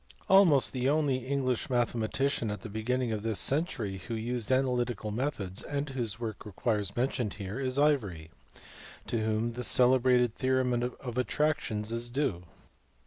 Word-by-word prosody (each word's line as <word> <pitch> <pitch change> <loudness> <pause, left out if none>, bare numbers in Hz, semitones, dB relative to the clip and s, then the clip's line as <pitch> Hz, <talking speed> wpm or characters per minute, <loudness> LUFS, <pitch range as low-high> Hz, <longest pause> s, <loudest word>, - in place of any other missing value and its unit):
Ivory. 190 - +3
Almost 165 -9 +6
the 130 0 +1
only 145 -3 +2
English 130 -3 -1
mathematician 120 0 0
at 105 -2 -4
the 110 - -7
beginning 120 +3 -1
of 110 -1 -2
this 110 -1 -1
century 130 - 0
who 115 - -3
used 120 +1 -2
analytical 125 -4 0
methods 105 -6 -2
and 145 0 -3
whose 120 -6 -3
work 110 -3 -5
requires 105 -1 -2
mention 125 -2 0
here 100 +4 -6
is 130 -1 -1
Ivory, 105 - +1 0.7
to 115 - -1
whom 110 +2 0
the 125 +1 -5
celebrated 125 -1 +4
theorem 130 0 +1
in 120 +1 0
attractions 125 -3 -1
is 120 +1 -2
due. 120 -10 -1
120 Hz, 150 wpm, -30 LUFS, 110-130 Hz, 0.7 s, Almost